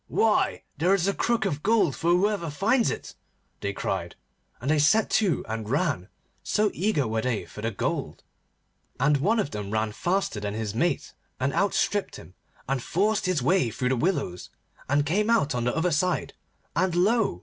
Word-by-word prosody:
'Why! 220 Hz, -1 st, +1 dB, 0.2 s
there 180 Hz, +5 st, +4 dB
is 190 Hz, -1 st, 0 dB
a 200 Hz, -, +2 dB
crook 235 Hz, +3 st, 0 dB
of 145 Hz, 0 st, -2 dB
gold 200 Hz, -, +2 dB
for 165 Hz, -, -1 dB
whoever 180 Hz, -1 st, +2 dB
finds 220 Hz, -, +2 dB
it,' -, -, -5 dB, 0.5 s
they 100 Hz, -, -2 dB
cried, 90 Hz, -3 st, -3 dB, 0.4 s
and 135 Hz, +5 st, -1 dB
they 155 Hz, -, +3 dB
set 215 Hz, +10 st, +3 dB
to 200 Hz, -6 st, +2 dB
and 110 Hz, -1 st, -4 dB
ran, 145 Hz, -, 0 dB, 0.3 s
so 210 Hz, -1 st, +1 dB
eager 170 Hz, -, 0 dB
were 110 Hz, 0 st, -1 dB
they 125 Hz, -3 st, -1 dB
for 105 Hz, -, -10 dB
the 115 Hz, -, -1 dB
gold. 100 Hz, -, -3 dB, 0.8 s
And 145 Hz, +3 st, +3 dB
one 205 Hz, +11 st, +2 dB
of 145 Hz, -, -1 dB
them 105 Hz, -1 st, -5 dB
ran 110 Hz, 0 st, 0 dB
faster 175 Hz, -, -1 dB
than 105 Hz, 0 st, -4 dB
his 110 Hz, -2 st, -3 dB
mate, 170 Hz, +10 st, -1 dB, 0.3 s
and 130 Hz, +1 st, 0 dB
outstripped 200 Hz, 0 st, 0 dB
him, 90 Hz, -, -12 dB, 0.3 s
and 135 Hz, -1 st, -1 dB
forced 205 Hz, -, 0 dB
his 175 Hz, -8 st, 0 dB
way 175 Hz, -2 st, +3 dB
through 125 Hz, +3 st, -2 dB
the 130 Hz, -, +2 dB
willows, 120 Hz, -, -1 dB, 0.4 s
and 145 Hz, +1 st, +2 dB
came 205 Hz, +8 st, +1 dB
out 220 Hz, -12 st, +3 dB
on 120 Hz, -1 st, -1 dB
the 125 Hz, -, 0 dB
other 175 Hz, +2 st, +1 dB
side, 180 Hz, +4 st, 0 dB, 0.4 s
and 180 Hz, 0 st, +1 dB
lo! 200 Hz, -, +2 dB
155 Hz, 185 wpm, -26 LUFS, 120-195 Hz, 0.8 s, there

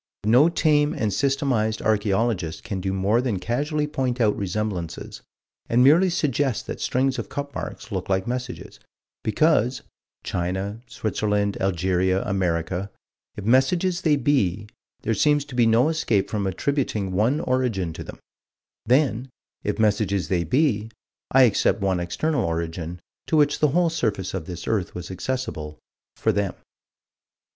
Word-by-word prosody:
But 105 Hz, -, +1 dB
no 140 Hz, +8 st, +6 dB
tame 150 Hz, -3 st, +2 dB
and 105 Hz, -3 st, -1 dB
systematized 135 Hz, -6 st, +1 dB
archaeologist 100 Hz, -5 st, 0 dB
can 100 Hz, -5 st, -4 dB
do 95 Hz, +1 st, -1 dB
more 100 Hz, +5 st, +2 dB
than 120 Hz, -6 st, -1 dB
casually 145 Hz, -, -1 dB
point 130 Hz, -4 st, -2 dB
out 110 Hz, -3 st, +3 dB
resemblances, 95 Hz, -3 st, -4 dB, 0.5 s
and 120 Hz, +2 st, +4 dB
merely 165 Hz, +8 st, +6 dB
suggest 145 Hz, -7 st, 0 dB
that -, -, -6 dB
strings 130 Hz, 0 st, +1 dB
of 115 Hz, -, -5 dB
cup 140 Hz, 0 st, -5 dB
marks -, -, -6 dB
look -, -, -3 dB
like 95 Hz, +1 st, +1 dB
messages, 125 Hz, +1 st, -5 dB, 0.4 s
because 125 Hz, +1 st, +2 dB, 0.4 s
China, 95 Hz, +5 st, -3 dB
Switzerland, 105 Hz, -2 st, -1 dB
Algeria, 95 Hz, 0 st, +1 dB
America 90 Hz, 0 st, -1 dB, 0.5 s
if 100 Hz, -, -6 dB
messages 170 Hz, -, +2 dB
they 155 Hz, -4 st, +3 dB
be, 105 Hz, -9 st, +1 dB, 0.4 s
there 115 Hz, -, +1 dB
seems 145 Hz, +6 st, +2 dB
to 145 Hz, -, -12 dB
be 120 Hz, -2 st, +3 dB
no 115 Hz, +5 st, +4 dB
escape 140 Hz, -11 st, 0 dB
from 100 Hz, -3 st, -1 dB
attributing 105 Hz, -2 st, -1 dB
one 110 Hz, +10 st, +2 dB
origin 120 Hz, -, 0 dB
to -, -, -7 dB
them -, -, -10 dB, 0.7 s
then, 130 Hz, -1 st, +2 dB, 0.3 s
if -, -, -1 dB
messages 100 Hz, -5 st, +1 dB
they 90 Hz, -2 st, +1 dB
be, 110 Hz, -, +1 dB, 0.4 s
I 135 Hz, 0 st, +6 dB
accept 115 Hz, -1 st, +3 dB
one 95 Hz, -3 st, 0 dB
external 120 Hz, -, -1 dB
origin, 85 Hz, +1 st, -3 dB, 0.3 s
to 160 Hz, -, +2 dB
which 145 Hz, -1 st, +3 dB
the 150 Hz, -, +4 dB
whole 170 Hz, +3 st, +2 dB
surface 110 Hz, -, -1 dB
of 95 Hz, -4 st, -4 dB
this 90 Hz, -2 st, -7 dB
earth 100 Hz, -6 st, -1 dB
was 90 Hz, 0 st, -6 dB
accessible, 90 Hz, -8 st, -4 dB, 0.4 s
for 110 Hz, -, +1 dB
them. 100 Hz, -2 st, -1 dB
110 Hz, 150 wpm, -24 LUFS, 95-135 Hz, 0.7 s, no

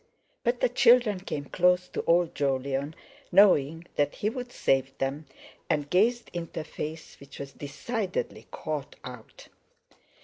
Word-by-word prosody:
_" -, -, -37 dB, 0.4 s
But 240 Hz, 0 st, 0 dB
the 250 Hz, -, +4 dB
children 235 Hz, -4 st, +5 dB
came 150 Hz, -6 st, -5 dB
close 180 Hz, +3 st, +2 dB
to -, -, -3 dB
old 170 Hz, 0 st, +3 dB
Jolyon, 140 Hz, +2 st, -1 dB, 0.4 s
knowing 165 Hz, -5 st, +5 dB
that 145 Hz, 0 st, +1 dB
he 210 Hz, -, -1 dB
would 250 Hz, 0 st, -6 dB
save 135 Hz, -, +1 dB
them, 140 Hz, +3 st, -3 dB, 0.4 s
and 150 Hz, -3 st, 0 dB
gazed 230 Hz, +6 st, +2 dB
into 170 Hz, -2 st, -4 dB
a -, -, -6 dB
face 155 Hz, 0 st, -7 dB
which 140 Hz, 0 st, -12 dB
was 140 Hz, 0 st, -7 dB
decidedly 190 Hz, -, -4 dB
"caught 155 Hz, -3 st, -5 dB
out." 125 Hz, -3 st, -11 dB
160 Hz, 145 wpm, -28 LUFS, 140-200 Hz, 0.4 s, children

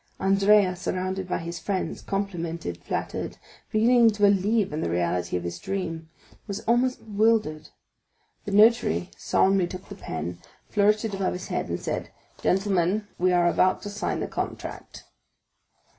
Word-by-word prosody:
Andrea, 195 Hz, 0 st, +4 dB
surrounded 185 Hz, +1 st, -3 dB
by -, -, -1 dB
his 170 Hz, 0 st, -5 dB
friends, 195 Hz, -2 st, -3 dB
complimented, 170 Hz, -, -4 dB
flattered, -, -, -3 dB, 0.3 s
beginning 230 Hz, +2 st, +5 dB
to 210 Hz, -1 st, -3 dB
believe 200 Hz, -1 st, +3 dB
in 155 Hz, -, -2 dB
the -, -, -1 dB
reality 85 Hz, +1 st, 0 dB
of 90 Hz, -, -5 dB
his 85 Hz, 0 st, -5 dB
dream, 165 Hz, -4 st, -4 dB, 0.4 s
was 200 Hz, 0 st, -4 dB
almost 245 Hz, +3 st, +2 dB
bewildered. 210 Hz, -8 st, +1 dB, 0.8 s
The 205 Hz, -, -4 dB
notary 210 Hz, -, +4 dB
solemnly 190 Hz, -, +2 dB
took 185 Hz, +1 st, -9 dB
the -, -, -6 dB
pen, 85 Hz, -, -5 dB, 0.3 s
flourished 210 Hz, +2 st, +2 dB
it 215 Hz, -, -3 dB
above 195 Hz, -1 st, -1 dB
his 180 Hz, -, -6 dB
head, -, -, -2 dB
and -, -, -2 dB
said: -, -, -3 dB, 0.3 s
"Gentlemen, 195 Hz, +1 st, +1 dB
we 185 Hz, +1 st, +3 dB
are 175 Hz, -1 st, +4 dB
about 185 Hz, +2 st, +2 dB
to 205 Hz, -, -5 dB
sign 205 Hz, +1 st, -2 dB
the -, -, -2 dB
contract." -, -, -6 dB
190 Hz, 150 wpm, -26 LUFS, 170-210 Hz, 0.8 s, beginning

